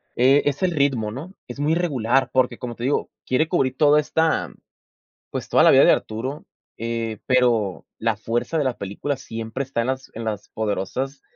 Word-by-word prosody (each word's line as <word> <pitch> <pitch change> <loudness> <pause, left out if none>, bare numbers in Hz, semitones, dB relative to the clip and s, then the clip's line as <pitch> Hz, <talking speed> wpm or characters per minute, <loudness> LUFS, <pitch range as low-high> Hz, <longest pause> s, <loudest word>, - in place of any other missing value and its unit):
eh, 135 +4 +5
es 145 +5 -4
el 185 - +3
ritmo, 135 -9 +1
¿no?, 155 - -8
es 120 +3 -8
muy 150 +3 +2
regular, 135 -7 +1
porque, 125 -2 +1
como 120 -1 -6
te 120 - -8
digo, 135 +3 0 0.2
quiere 155 +5 +1
cubrir 135 -8 +1
toda 150 0 +5
esta, 160 +2 0 0.8
pues, - - -5
toda - - +4
la - - +7
vida - - +7
de - - +7
Arturo, 130 +7 -3 0.3
eh, 115 -1 -3
pero 120 -7 +2
la 115 -1 0
fuerza 120 +8 -2
de 150 - +1
la 130 -2 -1
película 105 +8 -3
siempre 115 +1 -5
está 130 -3 -2
en 115 - -1
las 130 0 -3
en 115 0 -5
las 105 -2 -4
poderosas 110 +6 -3
130 Hz, 190 wpm, -23 LUFS, 115-140 Hz, 0.8 s, la